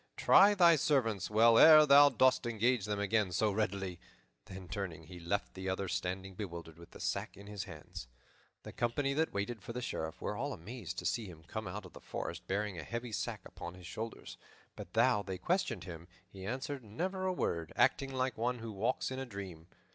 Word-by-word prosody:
Try 205 +1 +6
thy 170 -4 +6
servants 115 -10 +1
well 115 +2 +6
ere 155 -1 +9
thou 145 0 +8
dost 130 -1 +3
engage 120 -1 +1
them 105 -1 -2
again 100 -1 +1
so 105 +4 +1
readily." 95 -4 -2 0.5
Then, 95 -1 -9
turning, 95 -3 -5
he 90 +3 -11
left 85 +4 -2
the 95 0 -4
other 95 +1 -2
standing 95 +2 -3
bewildered, 85 -4 -7
with 85 - -13
the - - -13
sack - - -3
in 100 - -11
his 100 -2 -6
hands. 75 - -9 0.6
The - - -8
company 135 +4 0
that 160 +3 0
waited 105 +3 -3
for 115 - -7
the 125 - -3
Sheriff 80 -5 -4
were 105 - -3
all 140 +5 -3
amazed 100 -1 -7
to - - -5
see 115 -3 -1
him 80 -3 -12
come 85 - -6
out - - -6
of - - -13
the - - -12
forest - - -6
bearing 100 -2 -2
a - - -6
heavy 115 0 -5
sack - - -3
upon 85 +1 -8
his 90 -1 -13
shoulders; 110 +5 -7 0.4
but - - -10
though 105 - +4
they 95 -2 -5
questioned 115 - -1
him, 85 -2 -9 0.2
he 95 -1 -9
answered 135 +3 -4
never 185 - -3
a - - +2
word, 85 - -2
acting 135 -1 +2
like 130 -1 -1
one 125 +2 0
who 115 -1 -7
walks 110 +6 -1
in 130 - -4
a 135 - -3
dream. 95 -7 -8
105 Hz, 210 wpm, -33 LUFS, 95-125 Hz, 0.6 s, ere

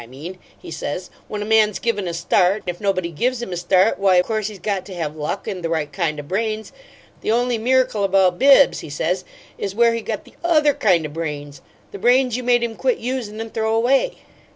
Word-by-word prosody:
I - - -14
mean,' 155 +9 -9 0.2
he - - -10
says, 180 +4 -5 0.2
'when 210 -1 -4
a - - -6
man's 215 -1 +3
given 210 -5 -1
a 170 - -3
start. 180 +4 +2
If 175 +1 -5
nobody 185 -4 0
gives 245 +10 -1
him 235 -6 -5
a - - -2
start, 185 +4 +2
why, 190 -2 +4
course 215 0 -2
he's 210 -2 -8
got 195 0 -2
to 190 - -8
have 155 -3 -4
luck 155 +6 -4
AND 185 -3 -4
the 165 - -1
right 155 -3 -2
kind 155 -2 -1
o' - - -5
brains. 215 +6 -3 0.5
The - - -3
only 240 0 +1
miracle 255 -3 +2
about 190 -2 +3
Bibbs,' 275 0 +6
he - - -9
says, 175 +6 -1 0.4
'is 195 -1 -4
where 235 +1 +4
he 230 - -2
got - - -5
the - - -18
OTHER 305 -4 +4
kind 175 -10 +2
o' - - -4
brains 145 -2 -6 0.3
the 405 - -8
brains 250 -1 +3
you 255 - -2
made 245 -1 +2
him 230 -1 -3
quit - - 0
usin' 235 -4 -4
and 225 0 -6
throw 220 0 0
away.'" 270 - +2
205 Hz, 225 wpm, -21 LUFS, 175-235 Hz, 0.5 s, Bibbs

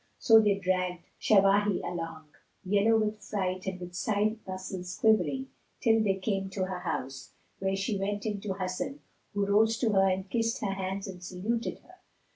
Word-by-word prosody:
So 225 -1 +7
they 210 -2 +3
dragged 185 -2 -1 0.2
Shawahi 200 -1 +4
along, 165 -3 -5 0.3
yellow 205 +4 +3
with 215 -1 -1
fright 185 -2 -3
and 190 -1 -3
with 180 0 -8
side 215 +3 0
muscles 185 -1 -5
quivering, 260 +5 +2 0.3
till 225 -2 +4
they 195 -2 +2
came 195 0 -2
to 190 0 -2
her 185 -1 -4
house, 135 -6 -4 0.3
where 195 0 0
she 195 +1 -1
went 205 +2 -2
in 205 -2 -2
to 195 -2 -2
Hasan, 195 +10 -4 0.3
who 200 -1 +1
rose 220 +3 +3
to 230 -3 +1
her 195 -1 +4
and 190 +1 -1
kissed 230 +2 0
her 195 -2 -1
hands 195 +1 -3
and 180 -2 -8
saluted 210 +6 -2
her. 365 +1 -18
195 Hz, 175 wpm, -29 LUFS, 185-215 Hz, 0.3 s, So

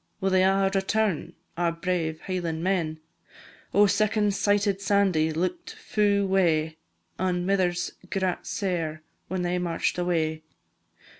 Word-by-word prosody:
Will 195 -1 0
they 185 0 +4
a' 195 0 +3
return, 195 -2 0 0.2
our 170 -1 +1
brave 165 -2 -2
Hieland 170 -3 -3
men? 170 -5 0 0.7
Oh, 205 +1 +5
second 210 0 +2
sighted 200 0 +1
Sandie 190 -6 +2
look'd 185 - -3
fu' 205 - +1
wae, 165 -5 +2 0.4
An' 180 -1 0
mithers 180 -2 +1 0.2
grat 190 -2 -2
sair 165 -5 -2 0.2
whan 185 0 -2
they 180 0 0
march'd 175 0 -1
away. 160 -3 0
185 Hz, 125 wpm, -26 LUFS, 165-195 Hz, 0.7 s, Oh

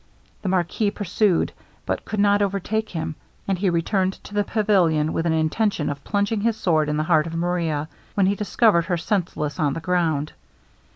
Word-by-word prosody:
The 190 - -2
marquis 185 +3 +1
pursued, 200 -2 +1 0.3
but - - -2
could 215 - -3
not 205 0 +4
overtake 205 +2 -1
him; 160 -2 -3 0.3
and 190 -2 0
he 195 0 +2
returned 185 +3 +1
to - - -11
the 205 0 +2
pavilion 180 -8 +2
with 165 - 0
an - - +2
intention 160 +1 0
of 140 0 -7
plunging 205 +1 0
his 225 0 +1
sword 160 -7 +1
in 150 - 0
the 155 - +1
heart 155 -1 +3
of 165 - -6
Maria, 165 -3 -1 0.3
when 200 - +3
he 195 - +3
discovered 205 -3 +2
her 175 0 0
senseless 165 -5 -2
on 145 -3 +2
the - - -3
ground. 165 -4 0
180 Hz, 185 wpm, -23 LUFS, 160-205 Hz, 0.3 s, not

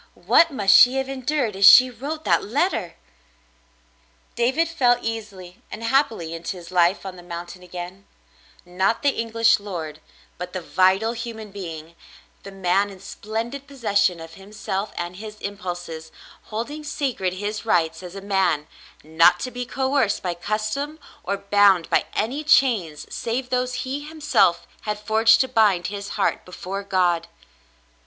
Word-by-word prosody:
What 335 - +4
must 205 -9 +3
she 250 +2 +7
have 265 0 -1
endured 265 -4 -2
as 195 - -2
she 255 +3 +8
wrote 295 +7 -6
that - - +2
letter! 225 - -1 1.4
David 260 +8 +1
fell 250 -7 +2
easily 205 -6 -7
and 225 - -8
happily 230 - 0
into 170 +3 -5
his 175 0 -11
life 180 +2 +2
on 185 -1 -7
the - - -11
moun 175 0 -7
tain 175 +1 -12
again 180 +2 -9 0.3
— - - -28 0.2
not 210 +7 +2
the 285 - +4
English 230 -2 +2
lord, 165 -7 -6 0.4
but 180 0 -6
the 185 - -3
vital, 190 +6 +2
human 220 -3 -7
being, 165 -5 -8 0.5
the 195 - -10
man 195 +1 +1
in 195 -2 -12
splendid 225 +7 -6
possession 205 -9 0
of 165 0 -10
himself 200 +1 -5
and 175 +1 -5
his 215 +1 -8
impulses, 175 -6 -6 0.3
holding 240 +8 -5
sacred 255 -11 -2
his 205 +3 -4
rights 165 -6 +1
as 180 0 -10
a 195 - -7
man, 190 -6 +1 0.4
not 165 +3 +4
to 255 - -4
be 245 0 -5
coerced 265 -5 0
by 180 -2 -1
custom 215 - -3 0.3
or 200 +2 -2
bound 200 -3 +3
by - - +3
any 260 +8 -1
chains 230 - +2
save 245 +2 -3
those 250 0 0
he 265 +2 -3
himself 290 - +1 0.2
had 210 -1 -3
forged 220 +1 +4
to 260 - +1
bind 210 -8 +2
his 200 0 -6
heart 200 - 0
before 185 +2 -6
God. 180 -4 +1
205 Hz, 155 wpm, -23 LUFS, 180-245 Hz, 1.4 s, she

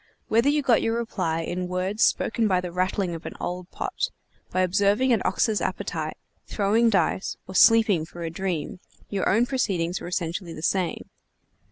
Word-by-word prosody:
Whether 230 +5 +4
you 295 0 +1
got 245 -4 +4
your 225 - 0
reply 180 -8 -2
in 180 +2 -3
words 185 +4 -1
spoken 225 -1 +2
by 185 -3 +2
the 180 -1 -5
rattling 185 0 -1
of 165 0 -7
an - - -8
old 180 0 -4
pot, - - -3 0.4
by 185 - 0
observing 200 +7 +3
an 220 - +2
ox's 210 +3 +1
appetite, - - -3 0.3
throwing 220 +3 +2
dice, 190 -2 0
or 190 - -8
sleeping 215 -5 +5
for 175 0 -8
a 165 - -3
dream, 175 -2 -3 0.3
your 200 -2 0
own 230 +4 +3
proceedings 190 -9 -1
were - - -6
essentially 175 0 -3
the 155 - -9
same. 185 -1 -1
190 Hz, 175 wpm, -25 LUFS, 175-220 Hz, 0.4 s, sleeping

